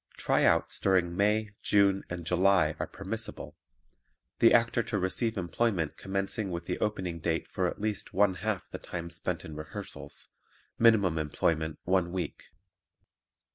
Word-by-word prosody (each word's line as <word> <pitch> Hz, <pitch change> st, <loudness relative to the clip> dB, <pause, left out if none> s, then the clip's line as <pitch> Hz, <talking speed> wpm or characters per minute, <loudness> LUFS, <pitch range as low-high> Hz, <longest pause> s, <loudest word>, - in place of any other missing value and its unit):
"Tryouts" -, -, +2 dB
during 90 Hz, -3 st, +2 dB
May, 105 Hz, +2 st, +2 dB
June 100 Hz, -1 st, +3 dB
and 90 Hz, -1 st, -5 dB
July 90 Hz, -2 st, +3 dB
are -, -, -2 dB
permissible; -, -, -6 dB, 0.8 s
the 115 Hz, -, +7 dB
actor 115 Hz, 0 st, +4 dB
to 110 Hz, -1 st, -2 dB
receive 105 Hz, +4 st, -1 dB
employment 90 Hz, -2 st, 0 dB
commencing 95 Hz, +2 st, -2 dB
with 85 Hz, -1 st, -4 dB
the -, -, -3 dB
opening 95 Hz, -5 st, -2 dB
date 80 Hz, 0 st, -1 dB
for -, -, -1 dB
at -, -, -5 dB
least 105 Hz, -1 st, -2 dB
one 100 Hz, 0 st, +3 dB
half 105 Hz, -3 st, -2 dB
the -, -, -7 dB
time 85 Hz, -1 st, -6 dB
spent -, -, -3 dB
in 80 Hz, -, -8 dB
rehearsals; 75 Hz, 0 st, -7 dB, 0.5 s
minimum 100 Hz, -8 st, +5 dB
employment 80 Hz, +1 st, 0 dB
one 90 Hz, -1 st, +1 dB
week. 90 Hz, -5 st, -4 dB
95 Hz, 140 wpm, -30 LUFS, 85-105 Hz, 0.8 s, the